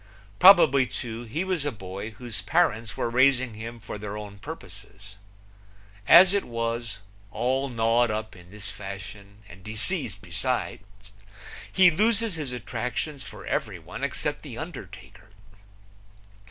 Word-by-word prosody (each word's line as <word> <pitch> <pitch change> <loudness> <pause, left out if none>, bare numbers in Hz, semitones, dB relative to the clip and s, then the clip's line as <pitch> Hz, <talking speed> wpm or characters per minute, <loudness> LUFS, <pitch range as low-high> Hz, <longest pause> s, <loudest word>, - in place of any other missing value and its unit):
Probably, 160 -9 +7
too, 115 +2 -6
he 150 +11 -2
was 185 -5 -1
a 145 - -1
boy 100 -1 -7
whose 115 -6 -6
parents 105 +1 +1
were - - 0
raising 130 0 +3
him 115 +2 -8
for 105 -1 -7
their 105 0 -5
own 100 -1 -9
purposes. 105 - -11 0.9
As 180 +3 +9
it 200 - +1
is, 115 -2 -3 0.3
all 130 +6 -1
gnawed 115 0 +2
up 110 0 -4
in 90 -1 -15
this 100 0 -5
fashion 100 +1 -9
and 90 +2 -14
deceased 110 - -1
besides, 100 +1 -4 0.6
he 185 -2 +6
loses 220 +4 +2
his 150 -5 -4
attractions 125 +4 -4
for - - -10
everyone - - -4
except - - -2
the - - -9
undertaker. - - -9
115 Hz, 130 wpm, -26 LUFS, 105-135 Hz, 0.9 s, As